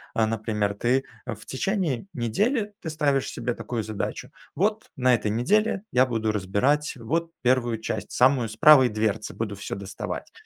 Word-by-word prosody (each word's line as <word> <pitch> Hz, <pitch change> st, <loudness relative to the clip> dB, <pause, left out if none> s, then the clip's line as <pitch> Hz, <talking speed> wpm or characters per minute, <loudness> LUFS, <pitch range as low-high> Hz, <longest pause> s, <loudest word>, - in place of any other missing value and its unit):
э, 110 Hz, -, +3 dB
например 105 Hz, -2 st, -1 dB
ты, 125 Hz, +5 st, +1 dB, 0.2 s
э, -, -, -3 dB
в 105 Hz, -, -15 dB
течение 165 Hz, -, -1 dB
недели, 205 Hz, -, 0 dB
ты 160 Hz, -, -4 dB
ставишь 145 Hz, -4 st, +1 dB
себе 125 Hz, -, -3 dB
такую 115 Hz, -3 st, -4 dB
задачу: 110 Hz, -1 st, -4 dB, 0.2 s
"Вот 210 Hz, +4 st, 0 dB
на 130 Hz, -1 st, +4 dB
этой 105 Hz, -2 st, -2 dB
неделе 200 Hz, -, +1 dB
я 125 Hz, +1 st, +5 dB
буду 115 Hz, -3 st, -1 dB
разбирать, 105 Hz, +11 st, 0 dB
вот, 165 Hz, +8 st, -2 dB
1 120 Hz, -2 st, +2 dB
часть, -, -, -4 dB
самую, 125 Hz, -2 st, +3 dB
с 110 Hz, -, -8 dB
правой 130 Hz, +1 st, +7 dB
дверцы 110 Hz, 0 st, -1 dB
буду 105 Hz, -3 st, -4 dB
всё 100 Hz, -, -5 dB
доставать". 100 Hz, 0 st, -6 dB
125 Hz, 165 wpm, -25 LUFS, 110-150 Hz, 0.2 s, правой